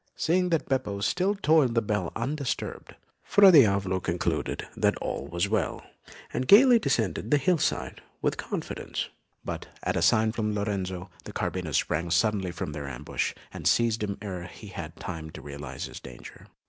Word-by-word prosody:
Seeing 180 +2 +1
that 165 -3 0
Beppo 130 -7 -1
still 185 - +1
tolled 155 - +3
the 115 - +4
bell 105 -5 -1
undisturbed, 135 +3 -3 0.3
Fra 200 -2 +7
Diavolo 100 - +5
concluded 85 -2 -2
that - - +2
all - - -4
was 85 +3 0
well, 100 -6 -1 0.5
and 130 - -1
gaily 240 +3 +8
descended 140 -8 0
the 150 - +5
hillside 155 +2 0 0.2
with - - 0
confidence; - - -4 0.4
but - - -5 0.2
at - - 0
a - - +1
sign 110 0 +4
from 105 -2 -1
Lorenzo, 95 -3 -3
the - - -8
carbineers 85 -6 -1
sprang 85 0 0
suddenly 95 +1 +2
from 85 -3 -4
their 75 -2 -5
ambush, 60 -3 -3 0.2
and - - -3
seized 115 -2 +3
him 100 -1 -2
ere 90 -4 -5
he 100 +3 -11
had 80 -3 -7
time 80 -3 -6
to - - -10
realise 70 -2 -6
his - - -8
danger. 65 -2 -12
105 Hz, 165 wpm, -27 LUFS, 90-135 Hz, 0.5 s, gaily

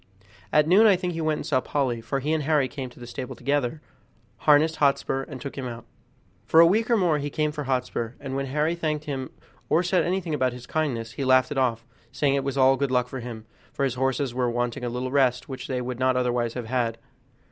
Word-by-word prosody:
At 150 0 +4
noon 200 +6 +6
I 200 - +6
think 180 -1 -3
he 165 - -3
went 155 -1 +1
and - - -6
saw 130 -3 +1
Polly, 130 -5 -1
for 135 +4 -3
he 150 +4 0
and 160 - +1
Harry 145 -2 +2
came 130 -1 -6
to 125 - -17
the 120 - -8
stable 125 +1 -6
together, 145 +1 -1 0.6
harnessed 155 +2 +4
Hotspur, 140 -1 +1
and 135 - -8
took 140 +2 -7
him 135 -2 -4
out. 120 -1 -8 0.6
For 160 +8 +4
a 165 - +10
week 215 +7 +2
or 235 - +4
more 170 -6 +2
he 145 +1 -3
came 150 +1 0
for 150 -1 -5
Hotspur, 125 -3 -2
and 135 -2 -5
when 135 0 -2
Harry 150 +4 0
thanked 155 -3 -2
him 135 -3 -4 0.4
or 170 - +3
said 180 +1 +2
anything 180 -2 -1
about 130 -4 +1
his 125 0 -10
kindness, 125 -8 -2
he 140 - -4
laughed 130 0 +4
it 145 - -3
off, 115 -3 0 0.3
saying 140 -2 +1
it 140 -1 0
was 135 0 -3
all 135 0 +5
good 140 0 0
luck 125 -1 +1
for 130 - -5
him, 115 -2 -8 0.3
for - - -3
his 135 -3 +1
horses 130 0 -1
were 125 -1 0
wanting 120 +2 -2
a 120 - -1
little 125 +2 -3
rest 130 -3 +2
which 130 -2 -7
they 130 -1 -2
would 125 0 -5
not 130 0 +2
otherwise 120 -2 0
have 125 -2 -4
had. 115 -1 -1
135 Hz, 245 wpm, -25 LUFS, 125-150 Hz, 0.6 s, a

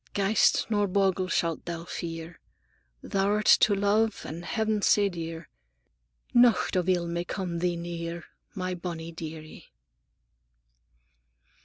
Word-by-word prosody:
Ghaist 200 +2 +3
nor 205 -1 +2
bogle 190 -1 +1
shalt 165 -2 -1
thou 170 -1 -5
fear, 165 -1 -6 0.6
Thou'rt 205 +2 0
to 205 - +4
love 205 +2 +1
and 165 +3 -6
Heav'n 220 +1 -1
sae 205 0 +4
dear, 165 -2 -6 0.9
Nocht 240 -4 +4
of 180 0 +1
ill 175 -2 +2
may 170 0 -2
come 175 -2 -4
thee 175 0 0
near, 170 0 -5 0.3
My 185 -2 -2
bonnie 170 -2 -6
dear 160 -1 -7
ie!" 155 - -14
180 Hz, 125 wpm, -27 LUFS, 170-200 Hz, 0.9 s, to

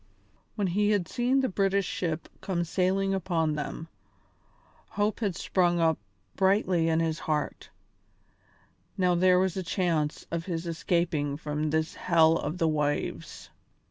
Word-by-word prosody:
When 205 - 0
he 205 +3 +1
had 200 -5 +1
seen 250 +6 +1
the 260 - +1
British 195 -1 +1
ship 165 -2 -3
come 175 -3 -1
sailing 190 +3 0
down - - +1
upon 165 -4 0
them, 150 +2 -5 1.0
hope 205 +1 -1
had 200 -6 -1
sprung 175 -1 +1
up 160 -2 +2 0.4
brightly 190 -3 +2
in 160 0 +2
his 165 -1 -1
heart; 150 -2 -3 1.3
now 180 -2 +3
there 180 +1 +4
was 185 -1 +1
a - - -1
chance 165 -4 -1
of 165 0 -3
his 170 -2 -3
escaping 165 -4 -1
from 150 0 -2
this 160 +1 0
hell 165 -2 +4
of 155 +3 -3
the 165 - +2
waves. 150 -2 -2
170 Hz, 145 wpm, -28 LUFS, 160-190 Hz, 1.3 s, there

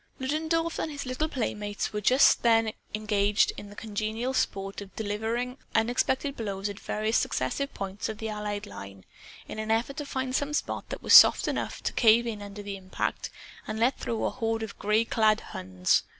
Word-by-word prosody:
Ludendorff 320 +4 -1
and 315 - -2
his 285 -2 -5
little 255 +5 -2
playmates 210 -6 -3
were 210 - -2
just 255 +6 +5
then 225 -2 +3 0.2
engaged 210 -1 +2
in 205 - -9
the 205 - -12
congenial 220 +4 -3
sport 195 -5 -2
of 195 -1 -11
delivering 225 +4 -2 0.2
unexpected 255 +4 +1
blows 200 -3 -3
at 200 +1 -7
various 215 +2 0
successive 275 - -1
points 195 0 -4
of 215 - -5
the 220 - -4
Allied 210 -1 -4
line, 100 - -10 0.4
in - - -6
an 220 0 -4
effort 235 +6 0
to 295 - -3
find 260 -1 -2
some 290 +2 0
spot - - -3
that - - -6
was - - +3
soft - - +9
enough - - -3
to - - -1
cave 230 0 +5
in 220 -3 -4
under 205 0 -8
the 200 -1 -5
impact 185 -1 -3 0.4
and 220 - -3
let 245 +4 +2
through 230 -1 -2
a - - 0
horde 225 -2 -2
of 220 - -8
gray 210 +2 +2
clad 220 -1 +3
Huns. 90 0 0
220 Hz, 190 wpm, -28 LUFS, 205-250 Hz, 0.4 s, soft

